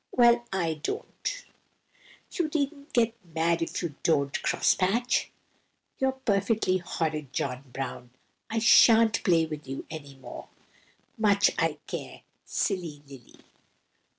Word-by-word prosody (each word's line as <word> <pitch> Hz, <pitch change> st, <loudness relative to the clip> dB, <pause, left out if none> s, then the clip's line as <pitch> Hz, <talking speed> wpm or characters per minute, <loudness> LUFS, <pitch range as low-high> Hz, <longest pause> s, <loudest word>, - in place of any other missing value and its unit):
"Well, 240 Hz, -1 st, +5 dB
I 165 Hz, -5 st, -1 dB
don't." -, -, -4 dB, 0.9 s
"You 340 Hz, -4 st, -1 dB
needn't 285 Hz, 0 st, -2 dB
get 235 Hz, -2 st, +2 dB
mad 165 Hz, 0 st, 0 dB
if 165 Hz, -, -3 dB
you 165 Hz, -4 st, -3 dB
don't. 140 Hz, -3 st, +1 dB
Cross -, -, +3 dB
patch!" 230 Hz, +7 st, +1 dB, 0.7 s
"You're 265 Hz, 0 st, +2 dB
perfectly 205 Hz, -6 st, +1 dB
horrid, 155 Hz, -5 st, -3 dB
John 130 Hz, 0 st, -3 dB
Brown; 125 Hz, -1 st, -5 dB, 0.4 s
I 225 Hz, -, -2 dB
sha'n't 225 Hz, 0 st, +6 dB
play 170 Hz, -4 st, +4 dB
with 155 Hz, -3 st, -7 dB
you 135 Hz, +1 st, -5 dB
any 145 Hz, -3 st, -8 dB
more." 135 Hz, -, -10 dB, 0.7 s
"Much 200 Hz, -2 st, +4 dB
I -, -, +1 dB
care, -, -, -7 dB, 0.2 s
silly 170 Hz, -8 st, -2 dB
Lily!" 135 Hz, -4 st, -14 dB
180 Hz, 125 wpm, -28 LUFS, 150-230 Hz, 0.9 s, sha'n't